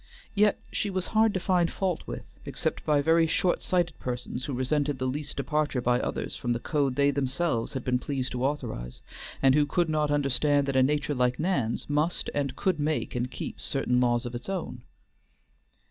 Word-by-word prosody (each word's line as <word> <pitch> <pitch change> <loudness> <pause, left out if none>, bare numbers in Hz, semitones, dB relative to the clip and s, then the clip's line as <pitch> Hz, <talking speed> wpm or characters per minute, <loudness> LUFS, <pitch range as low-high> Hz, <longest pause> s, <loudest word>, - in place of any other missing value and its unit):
Yet 210 0 +3
she 205 - -1
was 185 -1 -2
hard 220 0 +5
to - - +1
find 175 -2 +2
fault 185 -4 -2
with, - - -6 0.2
except - - -3
by 145 -2 +3
very 165 +1 +4
shortsighted 175 0 +1
persons 125 0 -4
who 145 - -3
resented 140 +3 0
the 130 - -2
least 145 +3 -3
departure 150 -1 0
by 125 0 +2
others - - -3
from 120 -2 -1
the 120 - -2
code 140 -1 0
they 140 +1 +4
themselves 135 -2 -1
had 130 -3 -3
been 125 -1 +2
pleased 135 -1 -3
to 125 0 -3
authorize, 110 - -3 0.4
and 135 -1 +6
who 145 0 +3
could 175 +1 +1
not 155 -1 +1
understand 145 0 +2
that 135 - -1
a 130 - +5
nature 145 +2 +1
like 125 -1 +1
Nan's 150 -10 -1
must 150 +4 0
and 140 -2 -1
could 185 0 0
make 150 +1 -1
and 125 0 -1
keep - - -6
certain 125 -3 +1
laws 120 -1 +2
of 120 - -5
its 120 +9 -6
own. 165 -10 -4
145 Hz, 190 wpm, -28 LUFS, 125-155 Hz, 0.4 s, and